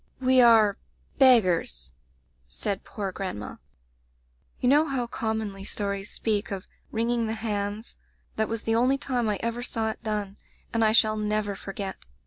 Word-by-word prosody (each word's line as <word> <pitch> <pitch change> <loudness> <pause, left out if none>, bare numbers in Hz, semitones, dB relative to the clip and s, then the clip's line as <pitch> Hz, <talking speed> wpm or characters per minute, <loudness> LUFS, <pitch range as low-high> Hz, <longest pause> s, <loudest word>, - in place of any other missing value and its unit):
"'We 260 0 +5
are 220 -4 +6 0.2
— - - -34
beggars,' 180 - +4 0.6
said 190 - -3
poor 200 -3 -4
grandma. 185 - -5 1.0
"You 250 - 0
know 295 +4 +5
how 265 -4 -1
commonly 220 -4 -3
stories 200 -1 -3
speak 210 -2 -1
of 195 -1 -5 0.3
'wringing 230 0 0
the 220 - -1
hands' 210 0 -3 0.2
— - - -40
that 220 0 0
was 225 -1 -3
the 225 - 0
only 250 +4 +3
time 245 -5 -1
I 205 - 0
ever 235 +1 -2
saw 225 -2 -1
it - - -11
done, 210 -3 -3 0.4
and 230 -1 +2
I 215 - +4
shall 215 -1 +4
never 210 -1 -1
forget. 195 0 -5
220 Hz, 160 wpm, -26 LUFS, 200-235 Hz, 1.0 s, are